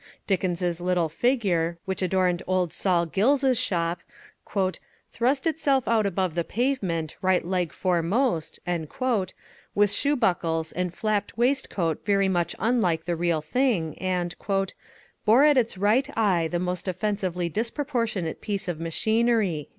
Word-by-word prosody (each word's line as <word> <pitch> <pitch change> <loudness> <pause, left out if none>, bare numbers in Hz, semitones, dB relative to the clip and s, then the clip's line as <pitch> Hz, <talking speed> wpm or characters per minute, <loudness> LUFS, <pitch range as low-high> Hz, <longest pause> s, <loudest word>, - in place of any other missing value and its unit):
Dickens's 180 -2 -1
little 175 -2 +1
figure, 175 - +1
which 190 -1 -3
adorned 180 -1 +1
old 185 -3 0
Sol 175 -3 +1
Gills's 255 - +2
shop, 170 -1 -1 1.1
"thrust 260 +4 0
itself 285 -5 +1
out 220 -3 +3
above 185 -3 -1
the 170 +1 0
pavement, 190 - -1
right 185 -2 +2
leg 180 -2 -1
foremost," 180 - 0 1.2
with 205 -1 +4
shoe 290 +1 +2
buckles 165 - 0
and 180 -1 -2
flapped 210 +3 -2
waistcoat 235 - 0
very 195 -1 +2
much 175 -3 0
unlike 195 -7 +1
the 175 0 -1
real 170 -2 0
thing, 175 - 0
and 180 -2 -1 0.9
"bore 230 +6 +5
at 300 -1 +6
its 235 -6 +1
right 220 +8 +2
eye 185 -7 +2
the 175 - -2
most 180 +1 -3
offensively 185 -2 -1
disproportionate 230 - -2
piece 200 -2 -3
of 175 -3 -3
machinery." 210 -1 +1
185 Hz, 130 wpm, -25 LUFS, 170-230 Hz, 1.2 s, at